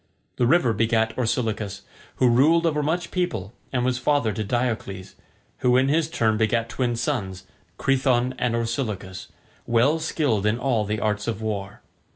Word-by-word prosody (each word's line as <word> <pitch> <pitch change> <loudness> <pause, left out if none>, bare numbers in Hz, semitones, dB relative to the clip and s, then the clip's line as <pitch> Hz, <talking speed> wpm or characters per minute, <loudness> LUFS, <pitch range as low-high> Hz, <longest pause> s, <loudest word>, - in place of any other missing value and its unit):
The 120 - +2
river 130 -5 +3
begat 110 +1 +1
Orsilochus, 110 -4 -2 0.3
who 130 - +3
ruled 150 +8 +4
over 150 -2 +1
much 165 +4 -1
people 115 - -2 0.2
and 125 -2 0
was 125 -1 0
father 135 -4 +1
to 110 - -3
Diocles, 110 -4 -3 0.5
who 125 0 +3
in 130 +1 +3
his 160 +1 +1
turn 110 -9 +1
begat 115 +1 +1
twin 120 0 -1
sons, 100 -8 -3 0.3
Crethon 130 -2 +1
and 120 -2 0
Orsilochus, 110 -6 -3 0.4
well 120 +7 +3
skilled 135 -10 0
in 110 +2 +1
all 120 -4 0
the 105 +1 -2
arts 105 0 -1
of 110 -3 -2
war. 100 -2 -4
120 Hz, 160 wpm, -24 LUFS, 110-135 Hz, 0.5 s, ruled